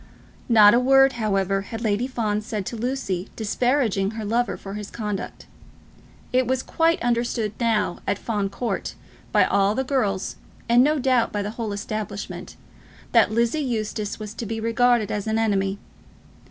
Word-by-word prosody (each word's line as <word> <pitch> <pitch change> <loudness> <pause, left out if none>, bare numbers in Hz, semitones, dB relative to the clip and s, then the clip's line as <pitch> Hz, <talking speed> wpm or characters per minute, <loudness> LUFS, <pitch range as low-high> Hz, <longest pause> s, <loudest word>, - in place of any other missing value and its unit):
Not 210 -3 +8
a 240 - +5
word, 270 +1 +5
however, 195 -3 0
had 225 +3 -7
Lady 220 +3 +1
Fawn 215 -5 -1
said 215 -2 -4
to 235 - -5
Lucy 220 -6 -3
disparaging 225 -2 +1
her 220 - -4
lover 235 +3 0
for 195 - -8
his 210 -1 -6
conduct. 210 -3 -5 0.9
It 255 -1 +3
was 260 0 0
quite 330 0 +1
understood 235 -3 0
now 220 -6 +1
at 200 - +1
Fawn 205 -3 -2
Court, 235 +4 -3 0.4
by - - +5
all 200 +1 +2
the 265 - 0
girls, 215 -8 -1 0.3
and 240 +1 +5
no 305 +2 +2
doubt 255 -3 +2
by 205 -1 -2
the 205 - -4
whole 225 -1 -4
establishment, 205 0 -5 0.6
that 230 -3 +5
Lizzie 235 +6 +1
Eustace 215 -5 -3
was 210 -1 -6
to 225 0 -6
be 225 +1 -3
regarded 230 -1 +2
as 205 0 -3
an 220 0 +1
enemy. 200 -3 +1
220 Hz, 165 wpm, -23 LUFS, 205-245 Hz, 0.9 s, Not